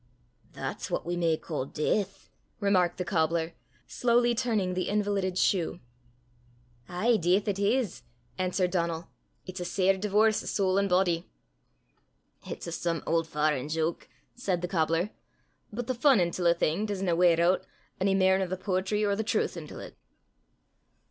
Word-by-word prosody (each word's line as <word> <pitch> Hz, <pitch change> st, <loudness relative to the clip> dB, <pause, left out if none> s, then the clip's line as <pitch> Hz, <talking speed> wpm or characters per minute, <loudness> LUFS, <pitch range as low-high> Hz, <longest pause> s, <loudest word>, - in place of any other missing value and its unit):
"That's -, -, -5 dB
what -, -, -2 dB
we 175 Hz, +1 st, -2 dB
may 165 Hz, -2 st, +1 dB
ca' 155 Hz, -5 st, -4 dB
deith!" 195 Hz, +7 st, -2 dB, 0.3 s
remarked 185 Hz, -4 st, +2 dB
the 180 Hz, -, -3 dB
cobbler, 165 Hz, -1 st, 0 dB, 0.3 s
slowly 240 Hz, 0 st, +2 dB
turning 220 Hz, -7 st, 0 dB
the 185 Hz, 0 st, -2 dB
invalided 200 Hz, -3 st, 0 dB
shoe. 175 Hz, -3 st, +1 dB, 1.1 s
"Ay, 220 Hz, +7 st, +2 dB
deith 185 Hz, +3 st, +2 dB
it 200 Hz, -1 st, -1 dB
is," 215 Hz, +1 st, 0 dB, 0.3 s
answered 185 Hz, 0 st, 0 dB
Donal; 170 Hz, -2 st, -1 dB, 0.4 s
"it's 185 Hz, 0 st, -7 dB
a -, -, -3 dB
sair 190 Hz, +2 st, +2 dB
divorce 210 Hz, +2 st, +2 dB
o' -, -, -9 dB
sole 190 Hz, -1 st, +1 dB
an' 200 Hz, -, +1 dB
body." 180 Hz, -2 st, +1 dB, 1.2 s
"It's -, -, -6 dB
a 170 Hz, -, -5 dB
some 165 Hz, 0 st, -2 dB
auld 165 Hz, 0 st, +1 dB
farrand 150 Hz, -2 st, 0 dB
joke," 160 Hz, +1 st, -2 dB, 0.2 s
said 185 Hz, -7 st, -2 dB
the -, -, 0 dB
cobbler, 165 Hz, +2 st, 0 dB, 0.6 s
"but 235 Hz, +3 st, -4 dB
the 255 Hz, -, -1 dB
fun 260 Hz, -1 st, +4 dB
intil 175 Hz, 0 st, +1 dB
a 170 Hz, -, +5 dB
thing 170 Hz, +6 st, 0 dB
doesna 190 Hz, -4 st, 0 dB
weir 170 Hz, -1 st, +4 dB
oot 175 Hz, +2 st, +3 dB, 0.4 s
ony 195 Hz, 0 st, +3 dB
mair 190 Hz, 0 st, +4 dB
nor 190 Hz, -, 0 dB
the 185 Hz, +1 st, -3 dB
poetry 190 Hz, +2 st, 0 dB
or 200 Hz, -1 st, +1 dB
the 220 Hz, -, -1 dB
trowth -, -, 0 dB
intil -, -, -8 dB
't." -, -, -17 dB
185 Hz, 160 wpm, -28 LUFS, 170-205 Hz, 1.2 s, a